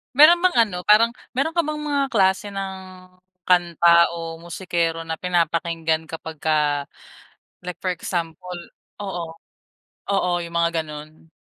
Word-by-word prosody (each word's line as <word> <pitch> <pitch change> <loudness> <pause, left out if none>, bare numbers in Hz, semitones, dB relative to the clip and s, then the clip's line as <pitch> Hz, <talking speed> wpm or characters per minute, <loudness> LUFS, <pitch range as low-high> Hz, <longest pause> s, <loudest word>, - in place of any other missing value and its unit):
Meron 310 +5 +8
bang 370 - +3
ano, 205 -5 -5
parang 225 +3 +6 0.2
meron 275 +5 +1
ka 340 - -1
bang 300 0 -3
mga 280 -1 +1
klase 195 -5 +2
ng 195 -1 -5 0.7
kanta 175 -2 +2 0.3
o 165 -1 -6
musikero 170 -1 -2
na 160 -1 -5
pinapakinggan 165 -2 0
kapagka 160 -1 -6 1.1
like 180 0 -6
for 185 -1 -2
example 175 +1 -4 0.4
oo. 195 -4 -4 0.9
Oo, 180 -3 +1
'yung 170 0 -7
mga 170 0 +2
gano'n? 155 +1 -11
175 Hz, 125 wpm, -22 LUFS, 165-200 Hz, 1.1 s, Meron